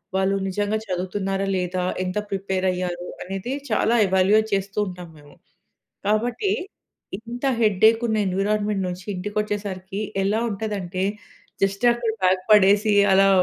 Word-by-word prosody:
వాళ్ళు 190 +1 +2
నిజంగా 205 +3 -1
చదువుతున్నారా, 195 +1 -2
లేదా 180 0 -2 0.2
ఎంత 185 +2 -3
ప్రిపేర్ 190 -1 -2
అయ్యారు, 180 -1 -4 0.2
అనేది 195 +6 -5 0.2
చాలా 230 - +2
ఎవాల్యుయేట్ 190 +4 +3
చేస్తూ 195 +1 -2
ఉంటాం 180 -2 -8
మేము. 145 -1 -17 0.7
కాబట్టి, 240 - +1 0.7
ఇంత 235 +3 -8 0.2
హెడ్‌ఏక్ 220 +2 +4
ఉన్న 220 - +1
ఎన్విరాన్మెంట్ 205 +1 0
నుంచి 180 0 -6
ఇంటికొచ్చేసరికి 200 0 -3 0.2
ఎలా 210 +3 +1
ఉంటదంటే, 195 -3 -3 0.6
జస్ట్ 195 +4 0
అక్కడ 235 -2 -2
బ్యాగ్ 185 0 +3
పడేసి, 205 +1 +5 0.2
అలా 195 +1 +5
195 Hz, 120 wpm, -23 LUFS, 185-210 Hz, 0.7 s, పడేసి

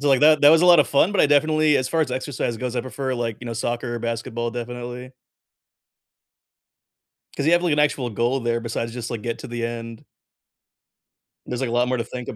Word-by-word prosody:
So, 145 - 0
like, 135 -2 +4
that 155 0 +5
that 145 - +7
was 165 +1 +5
a - - +4
lotta 175 -4 +7
fun, 155 +8 +2
but 205 - +2
I - - +5
definitely 155 +1 +3
as 130 - -1
far 165 +5 0
as 150 -5 0
exercise 130 -2 -3
goes, 125 +1 -4
I 120 - 0
prefer, 130 +1 -4
like, 115 -3 -3
you 120 - -8
know, 115 - -4
soccer 120 +1 -3
or - - -3
basketball, 115 0 -3
definitely. 120 +1 -7 2.2
'Cause 140 - -2
you 165 - +4
have 175 +1 +4
like 170 -4 +1
an 150 - +1
actual 140 -4 0
goal 120 +5 0
there 115 -1 -1
besides 115 0 -4
just 120 -1 -6
like 115 -3 -5
get 115 0 -4
to - - -9
the 120 -1 -4
end. 115 -1 -7 1.4
There's 125 0 -4
like 130 -3 -2
a - - -5
lot 120 +1 +2
more 130 - 0
to 115 - -2
think 125 -1 -8
125 Hz, 230 wpm, -22 LUFS, 120-145 Hz, 2.2 s, that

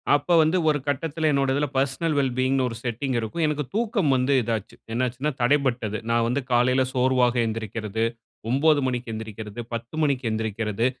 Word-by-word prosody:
அப்போ 145 +4 0
வந்து 160 +4 +3
ஒரு 150 -1 +2
கட்டத்தில 155 +2 0
என்னுடைய 135 -1 +1
இதில் 145 0 -1
பர்சனல் 140 +4 0
வெல் 135 -2 +2
பீயிங்ன்னு 130 0 +2
ஒரு 115 - -6
செட்டிங் 125 +2 -2
இருக்கும். 115 +9 -3
எனக்கு 150 0 -1
தூக்கம் 215 - +1
வந்து 130 +2 +2
இதாச்சு. 110 -2 -3 0.2
என்னாச்சுனா. 130 +4 -1
தடைப்பட்டது. 120 -5 +1
நா 115 - +2
வந்து 125 +4 0
காலையில் 125 +2 +3
சோர்வாக 125 -1 +2
எந்திரிக்கிறது, 110 -1 -3 0.5
9:00 145 +4 +4
மணிக்கு 125 -2 -2
எந்திரிக்கிறது, 110 0 -7
10:00 115 +5 -5
மணிக்கு 135 -4 0
எழுந்திரிக்கிறது 110 0 -1
130 Hz, 160 wpm, -24 LUFS, 115-145 Hz, 0.5 s, 9:00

